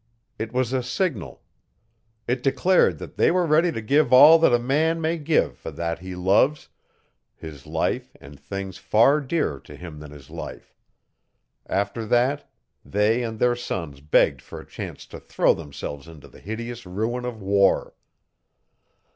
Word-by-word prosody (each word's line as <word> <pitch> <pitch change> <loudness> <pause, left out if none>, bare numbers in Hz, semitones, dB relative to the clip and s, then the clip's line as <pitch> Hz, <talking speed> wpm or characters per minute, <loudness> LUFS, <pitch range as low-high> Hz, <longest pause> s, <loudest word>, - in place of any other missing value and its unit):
It 110 0 -4
was 125 0 -1
a 130 - +1
signal. 125 - -3 0.8
It 125 +1 -1
declared 175 +7 +2
that - - -10
they - - +4
were 180 0 +2
ready 165 +2 +3
to 115 - -5
give 145 +8 +2
all 150 +6 +9
that 160 - +4
a 120 - +5
man 150 +7 0
may 165 +1 -1
give 155 +1 +1
for - - -7
that 85 -1 -4
he 95 +1 -8
loves 100 +11 +2 0.7
his 75 -4 -11
life - - -2
and 70 0 -14
things 95 +6 -7
far 135 +8 +3
dearer 140 - -2
to 75 - -13
him 80 -1 -10
than 75 -1 -10
his 70 -2 -14
life. - - -9 0.9
After 100 +4 -2
that, 125 +5 +1 0.3
they 105 - +1
and 115 -2 -4
their 120 +2 +2
sons 85 - -5
begged 70 -2 +2
for - - -10
a - - -12
chance - - -8
to - - -11
throw - - +2
themselves 70 -1 -8
into 80 -3 -13
the - - -17
hideous 115 +1 -7
ruin 110 +7 -3
of 120 -3 -5
war. 100 0 +2
115 Hz, 165 wpm, -24 LUFS, 85-135 Hz, 0.9 s, all